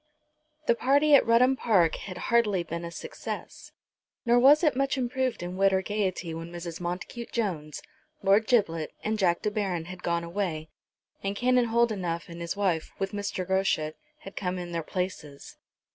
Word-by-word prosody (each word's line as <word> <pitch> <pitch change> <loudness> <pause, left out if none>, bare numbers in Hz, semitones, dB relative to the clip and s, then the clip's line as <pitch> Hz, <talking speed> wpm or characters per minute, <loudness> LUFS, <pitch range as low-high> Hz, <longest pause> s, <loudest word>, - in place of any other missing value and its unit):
The 235 - +4
party 285 +5 +3
at 280 - +7
Rudham 250 +3 +5
Park 190 -10 +3
had 185 -3 -7 0.2
hardly 210 -6 +3
been 170 +1 -5
a 170 - -4
success, 475 - -7 0.5
nor 240 +1 +5
was 285 +6 +6
it 300 -6 +3
much 275 +1 0
improved 255 -4 -1
in 180 +1 -5
wit 195 0 +4
or 190 0 +1
gaiety 190 -4 -2
when 165 +1 -7
Mrs. 170 -1 -6
Montacute 180 +7 -5
Jones, 165 -10 -3 0.4
Lord 205 +3 +4
Giblet, 165 -10 +1
and 215 0 -1
Jack 175 -3 +2
de 210 - 0
Baron 190 -6 -2
had 180 +1 -9
gone 170 -1 0
away, 170 -3 -3 0.5
and 195 +1 -2
Canon 250 +2 +3
Holdenough 205 -9 0
and 170 0 -8
his 170 +3 -3
wife, 180 -6 0
with 195 -1 -2
Mr. 200 -2 -3
Groschut, 190 -5 +1 0.3
had 195 - -10
come 185 -1 -2
in 175 -1 -6
their 170 -1 -2
places. 160 -5 -5
195 Hz, 175 wpm, -28 LUFS, 170-235 Hz, 0.5 s, at